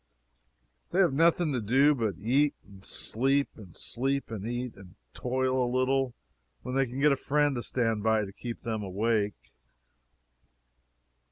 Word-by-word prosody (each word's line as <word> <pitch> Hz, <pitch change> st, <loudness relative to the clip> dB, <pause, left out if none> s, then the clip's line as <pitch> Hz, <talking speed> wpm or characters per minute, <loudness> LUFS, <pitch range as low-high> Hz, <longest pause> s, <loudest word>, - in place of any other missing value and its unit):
They 175 Hz, -, -2 dB
have 180 Hz, -7 st, +4 dB
nothing 165 Hz, +1 st, +3 dB
to 125 Hz, -, -1 dB
do 135 Hz, +8 st, +4 dB
but 110 Hz, -, -1 dB
eat 135 Hz, +9 st, +2 dB
and 95 Hz, -1 st, -15 dB
sleep 135 Hz, +8 st, 0 dB
and 95 Hz, -6 st, -13 dB
sleep 135 Hz, +1 st, -2 dB
and 110 Hz, -1 st, -4 dB
eat, 120 Hz, 0 st, -3 dB
and 95 Hz, -2 st, -14 dB, 0.2 s
toil 130 Hz, 0 st, 0 dB
a 120 Hz, -, 0 dB
little 130 Hz, 0 st, +1 dB, 0.5 s
when 125 Hz, -, -5 dB
they 135 Hz, 0 st, +2 dB
can 125 Hz, +3 st, -6 dB
get 150 Hz, +1 st, +5 dB
a -, -, +4 dB
friend 145 Hz, +1 st, +1 dB
to 120 Hz, -, -2 dB
stand 115 Hz, -3 st, 0 dB
by 110 Hz, 0 st, +3 dB
and 100 Hz, -1 st, -6 dB
keep 120 Hz, -2 st, -6 dB
them 110 Hz, -2 st, -2 dB
awake. 105 Hz, +2 st, -1 dB
125 Hz, 160 wpm, -29 LUFS, 110-135 Hz, 0.5 s, get